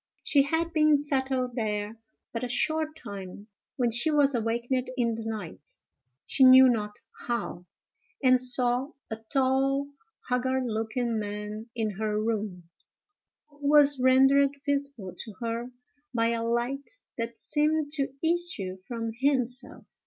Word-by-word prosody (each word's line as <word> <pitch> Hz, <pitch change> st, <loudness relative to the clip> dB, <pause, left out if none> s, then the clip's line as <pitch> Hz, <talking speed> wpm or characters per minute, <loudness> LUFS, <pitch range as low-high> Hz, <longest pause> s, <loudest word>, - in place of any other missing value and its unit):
She 285 Hz, -, +4 dB
had 325 Hz, +4 st, -1 dB
been 305 Hz, -1 st, +4 dB
settled 265 Hz, -3 st, -1 dB
there 210 Hz, -2 st, -2 dB, 0.4 s
but 230 Hz, +1 st, -3 dB
a -, -, -1 dB
short 310 Hz, +4 st, 0 dB
time, 200 Hz, -4 st, -9 dB, 0.3 s
when 245 Hz, -3 st, +1 dB
she 240 Hz, +8 st, +3 dB
was 290 Hz, -2 st, +3 dB
awakened 240 Hz, +2 st, -1 dB
in 235 Hz, -2 st, +1 dB
the 225 Hz, 0 st, -6 dB
night, 200 Hz, -9 st, -7 dB, 0.5 s
she 270 Hz, -, +2 dB
knew 260 Hz, 0 st, +9 dB
not 210 Hz, -4 st, -1 dB, 0.3 s
how, 235 Hz, -7 st, -3 dB, 0.6 s
and 255 Hz, -1 st, +5 dB
saw 250 Hz, +2 st, +2 dB, 0.2 s
a 220 Hz, -, -3 dB
tall, 270 Hz, +1 st, +1 dB, 0.4 s
haggard 260 Hz, +1 st, 0 dB
looking 225 Hz, +1 st, -2 dB
man 210 Hz, +2 st, -6 dB
in 215 Hz, -4 st, -2 dB
her 215 Hz, -1 st, -1 dB
room, 210 Hz, -6 st, -3 dB, 0.8 s
who 290 Hz, -1 st, -4 dB
was 290 Hz, -2 st, +6 dB
rendered 270 Hz, +2 st, +4 dB
visible 280 Hz, -9 st, -3 dB
to 220 Hz, -, -7 dB
her 235 Hz, +1 st, -3 dB, 0.5 s
by 230 Hz, 0 st, +2 dB
a 230 Hz, -1 st, -1 dB
light 245 Hz, -, -2 dB, 0.2 s
that 230 Hz, 0 st, -4 dB
seemed 300 Hz, 0 st, 0 dB
to 280 Hz, -3 st, 0 dB, 0.2 s
issue 325 Hz, -, 0 dB
from 230 Hz, -2 st, -4 dB
himself. 255 Hz, 0 st, 0 dB
250 Hz, 135 wpm, -27 LUFS, 225-280 Hz, 0.8 s, knew